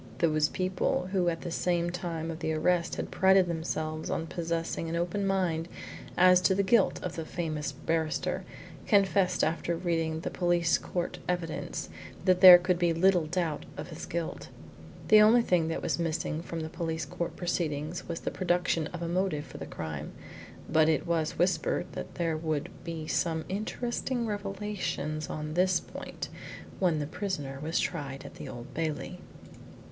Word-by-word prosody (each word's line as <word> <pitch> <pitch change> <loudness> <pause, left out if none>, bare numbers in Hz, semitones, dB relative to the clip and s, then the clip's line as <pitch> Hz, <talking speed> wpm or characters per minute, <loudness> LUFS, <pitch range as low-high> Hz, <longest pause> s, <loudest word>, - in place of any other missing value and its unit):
Those 155 -2 +2
people 185 0 -1
who 185 -3 +2
at 165 -1 -3
the 175 0 0
time 165 -2 -3
of 160 - -7
the 160 -1 -1
arrest 170 +2 +1
had - - -4
prided 190 0 +5
themselves 160 -2 -3
on 165 - -1
possessing 165 -1 -2
an 165 - -2
open 180 +4 -1
mind 175 -4 0 0.5
as 180 0 +7
to 185 +2 +3
the 200 - +2
guilt 195 +1 +3
of 180 - -4
the 165 - -3
famous 155 -3 -3
barrister, 155 +2 -1 0.4
confessed 195 -3 +3
after 170 +1 0
reading 165 -2 -1
the - - -3
police 175 -1 +2
court 175 -1 -3
evidence 175 -3 -2 0.4
that 185 -1 +4
there 180 -2 +13
could 180 0 0
be 170 -1 +3
little 175 -2 +4
doubt 165 -2 -2
of - - -6
his 160 -1 -7
guilt. 170 -1 -4 0.6
The 215 0 +9
only 230 +3 +6
thing 175 -6 +2
that 165 - -3
was - - 0
missing 160 -1 -1
from 165 -1 -5
the 160 - -3
police 160 -2 -3
court 170 +4 -4
proceedings 165 -2 -2
was 170 -1 -4
the - - -2
production 175 -3 +1
of 175 0 -6
a - - -2
motive 175 -4 0
for 130 - -10
the - - -6
crime, 80 -3 -6 0.5
but 160 0 +4
it 155 -3 +1
was 165 -2 0
whispered 175 -3 +1
that - - -7
there 165 -2 0
would 155 -2 -2
be 165 -2 -5
some 160 0 0
interesting 235 +4 -2
revelations 195 -7 -3
on 150 0 -4
this 185 +2 +3
point - - -7 0.5
when 175 -4 +2
the 150 - -1
prisoner 145 -5 -4
was 160 +3 0
tried 140 -5 -3
at - - -9
the - - -7
Old 120 +3 -9
Bailey. 165 +3 -3
170 Hz, 170 wpm, -29 LUFS, 160-185 Hz, 0.6 s, there